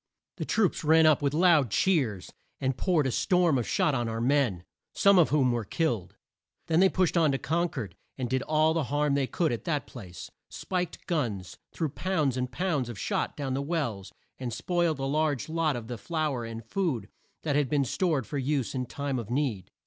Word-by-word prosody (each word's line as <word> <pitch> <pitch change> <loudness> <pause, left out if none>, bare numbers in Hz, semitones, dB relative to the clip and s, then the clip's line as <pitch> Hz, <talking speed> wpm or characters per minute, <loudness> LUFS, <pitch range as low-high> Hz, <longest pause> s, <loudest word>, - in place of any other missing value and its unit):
The - - -3
troops 210 -7 +1
ran 160 +1 +5
up, 155 -2 +5
with 140 -1 +1
loud 165 -7 +4
cheers, 115 - 0 0.3
and 130 -1 0
poured 165 -1 +1
a 130 - 0
storm 175 - +2
of 120 - -3
shot 150 - +2
on 120 -3 -1
our 115 0 -3
men, 120 -8 +1 0.3
some 200 -2 +5
of 165 - +4
whom 135 -4 +3
were 120 -1 -1
killed. 115 - -2 0.5
Then 160 0 +2
they 190 +1 +6
pushed 185 -2 +1
on 160 -4 +4
to - - +1
Con 170 +5 0
cord, 105 - -6 0.2
and 130 -2 -2
did 130 +2 0
all 155 +1 +2
the 160 -3 0
harm 145 +1 +1
they 140 -2 +1
could 165 +2 0
at 120 - -3
that 150 -4 -1
place: 95 -8 -10 0.2
spiked 180 -2 -4
guns, 115 - -2
threw 160 - -2
pounds 150 -3 -1
and 125 -1 -2
pounds 150 -5 -1
of 120 - -7
shot - - -2
down 135 -2 -2
the 135 - -1
wells, 140 - -3 0.3
and 125 -2 -4
spoiled 165 +6 0
a 135 - -3
large 145 -1 0
lot 160 -3 +1
of 120 0 -6
flour 155 -8 -2
and 115 -1 -7
food 130 - -1 0.4
that 145 -3 0
had 145 -3 +2
been 145 -2 +2
stored 155 0 0
there - - -19
for 145 - -3
use 135 -2 -1
in 125 -2 -3
time 140 0 -3
of 115 -3 -7
need. 125 -8 -1
140 Hz, 210 wpm, -28 LUFS, 120-160 Hz, 0.5 s, they